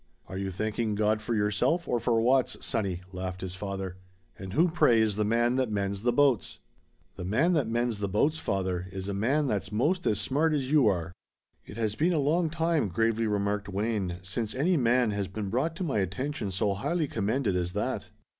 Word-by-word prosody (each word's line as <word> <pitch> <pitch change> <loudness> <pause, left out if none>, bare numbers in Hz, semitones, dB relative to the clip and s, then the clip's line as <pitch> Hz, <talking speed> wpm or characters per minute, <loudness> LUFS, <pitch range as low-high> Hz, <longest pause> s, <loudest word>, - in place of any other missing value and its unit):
"Are 95 - -6
you 95 0 -2
thanking 110 +3 -2
God 105 +1 +1
for 115 +1 -2
yourself 105 - +1
or 120 - +1
for 115 0 +2
Watts, 125 +3 +2
sonny?" 95 -6 -1
laughed 90 0 -5
his 95 -1 -5
father. 95 -1 -5 0.4
"And 95 -1 -8
who, 165 +6 +4
pray, 125 -9 +4
is 110 -2 +2
the 105 - +1
man 120 +3 +2
that 130 -3 +1
mends 100 -1 -2
the 120 +2 +2
boats?" 135 -3 +2 0.6
"The - - -5
man 130 - +2
that 150 -8 +1
mends 120 -1 -1
the 100 -1 -2
boats, 145 +11 +1
father, 95 -2 -2
is 95 0 -5
a 100 - -2
man 130 +10 +1
that's 105 -5 -2
'most 165 - +1
as 105 - +2
smart 155 +4 +1
as 135 -2 -1
you 145 -6 +5
are." 85 -5 0 0.6
"It 105 - -9
has 110 -2 0
been 165 +10 +1
a - - +1
long 160 +4 +2
time," 165 -5 +1
gravely 115 +4 +1
remarked 100 -1 -1
Wayne, 100 -3 -1
"since 105 +4 -4
any 165 +8 +2
man 125 -4 +3
has 100 -1 -2
been 100 +1 -5
brought 150 +8 0
to 185 - -4
my 135 -10 0
attention 120 +5 -2
so 100 +2 0
highly 155 - -1
commended 110 -2 0
as 90 0 -1
that." 105 - -2
110 Hz, 205 wpm, -28 LUFS, 100-135 Hz, 0.6 s, you